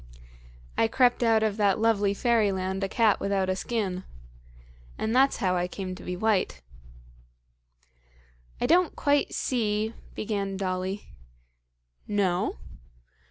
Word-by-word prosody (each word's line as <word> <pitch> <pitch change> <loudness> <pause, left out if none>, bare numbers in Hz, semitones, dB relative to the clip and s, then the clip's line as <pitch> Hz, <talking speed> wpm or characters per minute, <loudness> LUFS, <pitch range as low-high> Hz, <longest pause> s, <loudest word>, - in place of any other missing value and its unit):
"I 225 - +4
crept 245 +2 +3
out 225 -2 +3
of 215 -1 0
that 200 -3 +3
lovely 210 -3 +2
fairyland 195 -5 +1
a 195 - -1
cat 220 -2 +3
without 195 -1 0
a 185 - +1
skin. 190 -3 -2 0.9
And 220 +2 -1
that's 270 +2 +4
how 185 -1 +1
I 180 0 0
came 185 0 -5
to 185 - -10
be 180 - -4
white." 190 - 0 2.0
"I - - 0
don't 345 +4 +3
quite 285 0 +1
see 220 -3 -1
" - - -22
began 200 -2 -2
Dolly. 185 +1 -3 1.0
"No? 190 - 0
205 Hz, 125 wpm, -27 LUFS, 190-225 Hz, 2.0 s, I